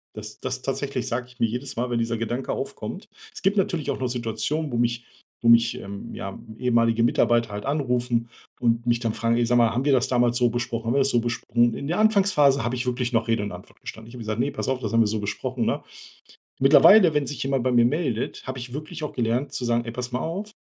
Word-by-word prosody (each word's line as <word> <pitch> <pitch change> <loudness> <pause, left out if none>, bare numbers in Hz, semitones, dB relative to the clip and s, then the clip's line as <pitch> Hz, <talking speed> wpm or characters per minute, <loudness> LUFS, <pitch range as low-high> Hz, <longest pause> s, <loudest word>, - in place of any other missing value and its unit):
Das 105 0 -9
das 130 0 -4
tatsächlich 135 -1 -3
sage 125 +1 -3
ich 125 - -20
mir - - +3
jedes 125 +4 -4
Mal, 125 +2 -2
wenn 120 -1 0
dieser 115 0 -1
Gedanke 120 +3 -3
aufkommt. - - -6 0.2
Es - - -9
gibt 195 +2 +1
natürlich 175 -6 0
auch - - -4
noch 130 - -1
Situationen, 125 +6 -2
wo 120 - -2
mich 120 0 0 0.4
wo 115 - +3
mich, 115 0 +5
ähm, 100 0 -8
ja 95 - -6 0.2
ehemalige 115 -2 +2
Mitarbeiter 120 -1 +2
halt 105 0 -5
anrufen 125 -4 0 0.3
und 115 0 +1
mich 120 -1 +2
dann 115 -2 -1
fragen: 115 +1 0
„Ey, 120 - +2
sag 120 +1 +2
mal 115 -1 +4
haben 120 +3 -1
wir 145 - +3
das 130 0 +3
damals 120 -2 +2
so 120 -1 +3
besprochen? 115 -1 -3
Haben 115 - +1
wir - - +4
das 135 0 +2
so 120 - +2
besprochen?“ 120 0 +1
In 140 - -5
der 175 +6 -1
Anfangsphase 190 - +4
habe 120 +2 -1
ich 125 +1 -3
wirklich 125 0 -1
noch 115 0 +1
Rede 115 -2 +1
und 105 - -4
Antwort - - -12
gestanden. 110 0 -9
Ich 120 - -12
habe - - -9
gesagt: 110 0 -3
„Ne, 140 +4 +1
pass 140 - -4
auf, 130 -1 0
das 110 -4 -4
haben 115 - +5
wir 110 - +3
so 110 +1 -1
besprochen 100 - -3
ne?“ - - -1 0.8
Mittlerweile, 160 +6 +7
wenn 150 -1 +1
sich 145 - -5
jemand 135 -2 0
bei 130 - +1
mir 120 -1 +5
meldet, 130 -4 -2
habe 130 0 -5
ich 125 0 -8
wirklich 155 +3 -6
auch 150 - -4
gelernt 125 +3 -1
zu 140 - -4
sagen: 120 0 +1
„Ey, 115 - -4
pass 125 +1 -5
mal 125 - -1
auf. 195 +8 -4
120 Hz, 255 wpm, -24 LUFS, 115-135 Hz, 0.8 s, Mittlerweile